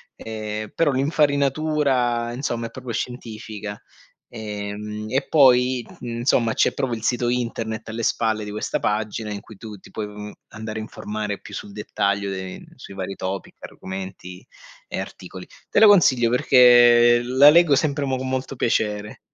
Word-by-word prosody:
Ehm, 110 -1 -6
però 165 -3 +2
l'infarinatura 140 -3 +1
insomma, 120 -3 -3
è - - -12
proprio 130 -2 -7
scientifica. 110 -3 -6 0.5
Ehm, 105 -1 -6
e 135 +4 -1
poi, 130 -3 +4 0.2
insomma, 120 -1 0
c'è - - +2
proprio 130 -3 -2
il 110 - -9
sito 120 0 0
internet 115 -2 -3
alle 115 +1 -4
spalle 110 -1 0
di 105 - -6
questa 105 - -2
pagina, 105 +1 -2
in 105 - -4
cui 110 - -14
tu 105 0 -9
ti - - -17
puoi, 110 - -4
uhm, 105 0 -9 0.2
andare 110 0 -6
a - - -4
informare 105 -1 -5
più - - -13
sul 100 - -7
dettaglio 100 -1 -1
dei 95 -1 -6
sui - - -11
vari 95 0 -5
topic, 95 0 -5
argomenti 95 0 -8 0.4
e - - -4
articoli. - - -9 0.2
Te - - +3
lo 220 - +8
consiglio 135 - +5
perché 120 -1 +6
la 130 +4 +6
leggo 165 -2 +5
sempre 145 0 0
mo 130 -1 -1
g - - -6
molto 130 +1 -3
piacere. 105 -3 -1
115 Hz, 160 wpm, -22 LUFS, 105-130 Hz, 0.5 s, lo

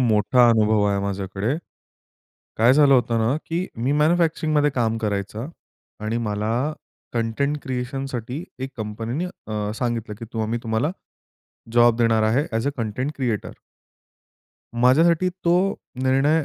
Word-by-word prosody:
मोठा 120 +1 +4
अनुभव 110 -2 +3
आहे 100 0 +1
माझ्याकडे. 100 +5 -2 1.0
काय 115 +3 +5
झालं 140 -2 +6
होतं 120 -2 +2
ना, 115 +5 +1
की 170 +3 -2 0.2
मी 130 +4 +1
मॅन्युफॅक्चरिंगमध्ये 155 -1 +2
काम 115 -4 0
करायचा 105 +2 -3 0.6
आणि 110 +2 -1
मला 105 +2 -1 0.6
कंटेंट 120 +6 0
क्रिएशनसाठी 130 +2 -4
एक 130 +1 -4
कंपनी 110 +1 -4
नी 175 - -1 0.2
अ, 105 -1 -2
सांगितलं 115 -3 -2
की - - -5 0.2
आम्ही 110 +2 -1
तुम्हाला 115 +7 0 0.8
जॉब 120 -1 +5
देणार 115 -2 +3
आहे 115 +7 +2
ॲज 115 +3 -1
अ - - +1
कंटेंट 120 +6 -2
क्रिएटर. 120 -6 -2 1.3
माझ्यासाठी 165 +8 +4 0.2
तो 170 0 +4 0.5
निर्णय 140 +4 +3
120 Hz, 130 wpm, -23 LUFS, 110-140 Hz, 1.3 s, झालं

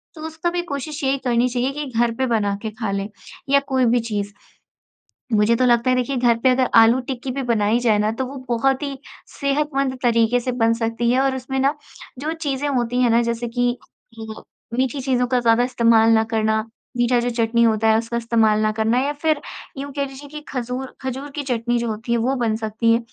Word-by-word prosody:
तो 310 - -10
उसका 320 +2 -2
भी 350 0 -1
कोशिश 300 -2 -5
यही 270 +1 +2
करनी 245 0 +2
चाहिए 250 +2 -1
कि 295 0 -4
घर 240 -1 +3
पे 260 - 0
बना 210 -4 +1
के 220 - -3
खा 215 -2 -4
लें 200 +1 -3 0.4
या 280 0 +5
कोई 260 -2 +2
भी 240 +1 +3
चीज़। 205 -3 -3 1.1
मुझे 215 +3 +3
तो 255 - +1
लगता 240 0 +3
है 255 - +3
देखिए 255 +2 -1
घर 240 -2 +3
पे 260 - +5
अगर 255 -1 +2
आलू-टिक्की 250 +2 +1
भी 270 +1 -3
बनाई 225 -2 +1
जाए 220 -4 +3
ना, 210 +1 +1
तो 260 +3 -3
वो 275 +2 -8
बहुत 265 +4 +1
ही 275 -2 -4 0.4
सेहतमंद 275 -2 0
तरीके 235 0 +3
से 250 +1 -2
बन 230 0 +4
सकती 230 +1 -1
है 255 +2 +3
और 270 -1 +1
उसमें 265 +1 -4
ना 275 +3 +2 0.4
जो 305 +4 -3
चीज़ें 290 -3 -2
होती 245 -2 0
हैं 240 - +3
ना, 235 +1 +4
जैसे 235 0 -2
कि 245 +1 0 0.4
अ, 220 0 -8 0.4
मीठी 265 +1 0
चीज़ों 250 -1 +1
का 250 0 +1
ज़्यादा 235 0 +3
इस्तेमाल 230 -2 +4
न 220 - +2
करना, 220 -1 +1 0.4
मीठा 240 0 +2
जो 245 +1 -1
चटनी 230 0 +1
होता 220 -1 +3
है 220 0 +4
उसका 235 +1 -3
इस्तेमाल 220 -2 +2
न 215 - +1
करना 225 +3 +1
या 285 +2 0
फिर 305 0 0 0.4
यूँ 280 0 -5
कह 280 - 0
लीजिए 275 +2 -11
कि 300 +1 -8
खजूर, 250 +1 -4
खजूर 265 +2 -5
की 295 - -3
चटनी 240 -2 -1
जो 235 0 -2
होती 225 +2 -4
है 235 - +2
वो 255 +4 +1
बन 225 -3 0
सकती 225 +1 0
है। 230 - +4
245 Hz, 220 wpm, -21 LUFS, 230-265 Hz, 1.1 s, या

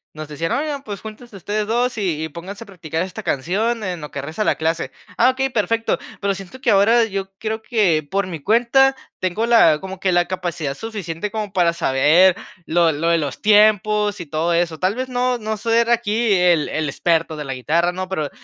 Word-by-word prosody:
nos 155 0 -7
decían, 155 +3 -4
oigan, 290 -1 -2
pues, 205 -5 -7
juntense 220 +1 -11
ustedes 205 +3 -2
2, 240 +2 0
y 170 -7 -1
y, 160 - -4
pónganse 185 +8 -8
a - - -19
practicar 165 -4 -5
esta 185 -1 -7
canción 210 - -1
en 180 -4 -4
lo 150 - -7
que 140 - -5
resta 155 +8 -6
de - - -4
la - - +3
clase. 160 -4 -2 0.3
Ah, 245 +2 +5
okey, 265 +1 -1
perfecto. 230 -1 0 0.2
Pero, 200 -1 +1
siento 195 +7 -10
que - - +1
ahora, 220 +4 +5
yo 195 -2 -5
creo 220 0 -3
que 195 -11 +2
por 195 0 -1
mi 170 -4 -6
cuenta 245 - +3 0.2
tengo 185 +5 -1
la 225 -10 +5
como 190 +1 -8
que 190 -1 +1
la 175 -1 +2
capacidad 175 -5 -3
suficiente, 205 -2 -5
como 215 -2 -4
para 175 -2 +2
saber 170 +4 +4 0.3
lo 170 0 +3
lo 155 +3 -1
de 170 - +4
los 145 -3 -4
tiempos, 210 0 +3
y 175 - -6
todo 160 +3 -1
eso. 170 -2 0
Tal 185 +3 0
vez, 255 +1 -4
no 250 0 0
no 220 -1 -4
soy 230 +2 0
aquí 235 -1 +1
el 175 -4 +3
el 155 -1 -2
experto 165 +2 0
de 150 -1 -6
la 135 - -4
guitarra, 165 +7 0
¿no? 185 +1 -5
Pero, 155 -6 -2
190 Hz, 215 wpm, -20 LUFS, 165-220 Hz, 0.3 s, Ah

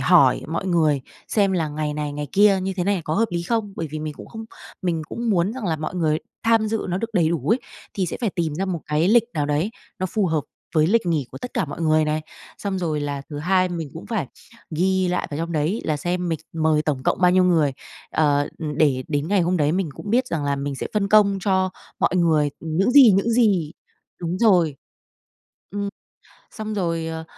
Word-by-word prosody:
hỏi - - +5
mọi 165 +4 -3
người 155 -6 +2 0.3
xem 200 -3 +2
là 165 -4 0
ngày 150 0 -3
này, 150 -1 -3
ngày 145 0 -4
kia 200 -1 +5
như 190 +1 -1
thế 180 - 0
này 200 -2 +1
có 155 - -1
hợp 225 +4 +3
lý 170 -1 -2
không? 215 0 -1
Bởi 165 - -3
vì 155 - -4
mình 155 -1 -5
cũng - - -11
không 225 -1 -8 0.4
mình 170 -3 0
cũng 235 -1 -2
muốn 185 +1 +2
rằng 250 -3 -6
là 160 -2 0
mọi 155 +4 -5
người 155 -3 +1 0.2
tham 225 -1 +3
dự 220 0 -2
nó 180 +1 -1
được 230 +1 -5
đầy 170 -5 +3
đủ 160 -4 -2
ấy, 250 - +1 0.3
thì 190 -3 0
sẽ - - -4
phải 225 - 0
tìm 165 -5 -2
ra 190 - -1
một 180 -4 -3
cái 155 +4 +1
lịch 230 +2 +5
nào 150 -2 0
đấy 150 +8 0 0.3
nó 185 - -1
phù 200 +1 0
hợp 160 -2 +1 0.3
với 155 -1 +4
lịch 215 +1 +2
nghỉ 155 -7 0
của - - -9
tất 250 - -7
cả - - +1
mọi 150 - -7
người 155 -1 +3
này. 155 +1 0 0.4
Xong 195 -2 -2
rồi 155 -4 -1
là 145 -1 -3
thứ 145 - -5
hai 185 +3 +2
mình 165 -5 -5
cũng 165 - -8
phải 205 - -2 0.4
ghi 185 +3 +1
lại 180 0 -1
vào 145 - -4
trong 170 +1 -3
đấy 160 +8 0
là 155 - 0
xem 175 +3 -2
mình 165 -2 -1
mời 155 -1 +2
tổng 145 -4 -2
cộng - - 0
bao 180 - +5
nhiêu 185 0 +4
người, 160 -6 +3 0.4
ờ, 145 -2 +2
ừm, 150 -2 -4
để 135 -4 +3
đến 145 +1 -1
ngày 200 -1 +3
hôm 180 +1 +1
đấy 150 0 +2
mình 185 -3 0
cũng 205 - -7
biết 250 +2 +3
rằng 155 -8 -2
là 140 0 0
mình 140 0 -3
sẽ - - -4
phân 200 -1 +1
công 200 -2 +5
cho 190 -1 +1 0.3
mọi 185 - +2
người, 155 -4 +3
ừm, 160 -1 -4
những 195 +6 +3
gì, 260 -4 +8
những 200 +4 +2
gì 200 -10 +2 0.5
đúng 175 +2 -2
rồi. 175 - +4 0.9
Ừm, 200 0 -3 0.7
xong 215 -1 -4
rồi, 165 -4 -1
ờ, 160 0 -5
170 Hz, 240 wpm, -23 LUFS, 155-195 Hz, 0.9 s, gì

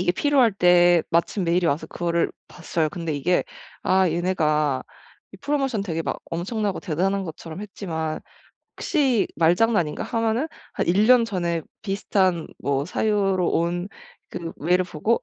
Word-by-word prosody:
이게 175 -1 +2
필요할 270 -2 +3
때 175 -2 +5
마침 170 +3 +1
메일이 175 +1 +2
와서 160 +1 0
그거를 170 0 -1 0.2
봤어요. 160 -2 -2
근데 165 -4 -4
이게 165 +6 +1 0.4
'아 190 0 +3
얘네가 155 -5 +1 0.5
이 - - -11
프로모션 270 -7 -1
되게 165 -4 -3
막 - - -3
엄청나고 195 +4 -2
대단한 190 +3 -1
것처럼 165 +2 -8
했지만 160 -6 -4 0.6
혹시 275 - +1
말장난인가?' 175 -1 +2
하면은 230 +4 0 0.3
한 - - -2
1 195 +5 +3
년 245 -1 +6
전에 175 -6 -2 0.2
비슷한 190 -4 0
뭐 140 0 -1
사유로 195 0 +1
온 175 +2 0 0.4
그 170 -2 -5
메일을 180 +4 +2
보고 180 +7 0
180 Hz, 300 characters per minute, -23 LUFS, 165-205 Hz, 0.6 s, 년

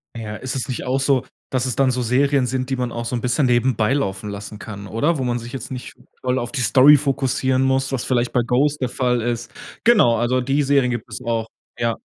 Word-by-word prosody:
Ja, 110 -2 -6
ist 130 +4 -5
es 130 - -2
nicht 130 - -4
auch 130 +2 0
so, 135 -2 +2 0.2
dass 130 -1 0
es 125 -3 -2
dann 135 -1 +3
so 125 -1 -1
Serien 135 +3 +2
sind, 130 +1 -2
die 135 - 0
man 125 -2 -2
auch 115 0 -4
so' 120 - -2
n 120 - -2
bisschen 125 +2 +1
nebenbei 120 -1 +2
laufen 105 -7 -2
lassen 105 +1 -7
kann, 100 -2 -8
oder? 145 - 0
Wo 130 - -2
man 120 -1 -1
sich 120 +1 -9
jetzt 130 -1 -6
nicht 125 -1 -7 0.3
voll 130 0 0
auf 120 -1 -3
die 135 -4 -2
Story 130 +6 +7
fokussieren 130 -1 0
muss, 135 0 +1
was 130 -3 -2
vielleicht 120 -1 0
bei 125 - +2
„Ghost“ 140 +5 +1
der 130 - -1
Fall 125 -2 0
ist. 120 0 -3 0.3
Genau, 205 - +5
also, 120 +2 +1
die 135 +3 +1
Serien 140 -2 +2
gibt 120 -1 -3
es - - -5
auch. 115 -2 -1 0.3
Ja. 115 -1 0
125 Hz, 245 wpm, -21 LUFS, 120-135 Hz, 0.3 s, Story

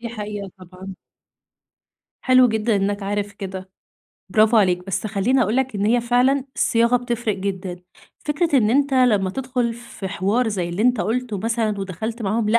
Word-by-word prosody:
دي 235 - -5
حقيقة 210 -3 -6
طبعًا. 185 +1 -10 1.3
حلو 255 -1 +6
جدًا 220 0 +1
إنّك 200 +1 -1
عارف 205 +1 -2
كده، 190 -2 -7 0.6
برافو 220 +2 +4
عليك. 180 -3 +2
بس 195 +3 -2
خلّيني 220 +6 +1
أقول 215 +2 0
لك 265 -3 0
إن 205 +1 0
هي 240 +2 +3
فعلًا 250 +3 +2
الصياغة 235 +1 +3
بتفرق 235 -3 -2
جدًا. 190 -2 -4 0.4
فكرة 295 0 0
إن 215 -2 +2
أنت 280 +2 +2
لمّا 215 -7 +3
تدخل 250 0 -2
في 235 -5 -8
حوار 205 +6 0
زي 185 -5 -2
اللي 175 +5 -2
أنت 250 +1 +3
قُلته 225 +2 -2
مثلًا 225 0 -1
ودخلت 220 +5 -5
معاهم 215 +2 0
لأ، 235 +2 +5
220 Hz, 165 wpm, -21 LUFS, 195-245 Hz, 1.3 s, حلو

